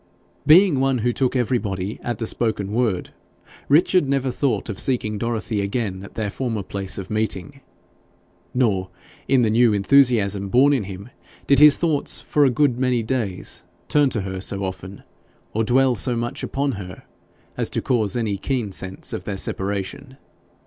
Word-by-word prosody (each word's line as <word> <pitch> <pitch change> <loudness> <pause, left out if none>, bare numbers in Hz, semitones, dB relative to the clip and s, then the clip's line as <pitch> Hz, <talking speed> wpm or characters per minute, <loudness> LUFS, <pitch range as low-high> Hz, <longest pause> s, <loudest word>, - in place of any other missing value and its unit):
Being 170 -2 +6
one 135 -1 +2
who 120 - +2
took 130 +1 0
everybody 110 -5 -1
at 120 -2 -3
the 115 - -3
spoken 110 -3 -1
word, 110 -5 -1 0.6
Richard 155 0 +4
never 135 -1 0
thought 120 -7 -1
of 105 -4 -5
seeking 110 -5 0
Dorothy 110 -2 -2
again 100 -2 -3
at 100 - -12
their 105 -3 -2
former 115 -3 -3
place 95 0 -4
of 95 0 -7
meeting. 110 +5 -2 0.9
Nor, 100 -7 0 0.4
in 130 -2 +3
the 110 - +2
new 115 0 +4
enthusiasm 105 -4 +3
born 135 +6 +4
in 125 -8 0
him, 100 +3 -9 0.4
did 140 -1 +4
his 150 -1 +8
thoughts 160 -4 0
for 145 -1 +2
a - - +4
good 125 -1 +1
many 125 -3 +1
days 110 -6 -3 0.3
turn 145 -2 +3
to 110 - -2
her 95 -1 -5
so 100 0 -2
often, 95 +1 -7 0.5
or 110 - +1
dwell 130 +3 +3
so 120 +2 +1
much 120 +1 -3
upon 140 +1 -1
her, 95 -5 -8 0.5
as - - -1
to - - -1
cause 110 -6 0
any 110 -4 -1
keen 120 -4 -2
sense 95 0 -3
of - - -5
their 100 -2 -4
separation. 100 +8 -3
115 Hz, 170 wpm, -22 LUFS, 100-130 Hz, 0.9 s, his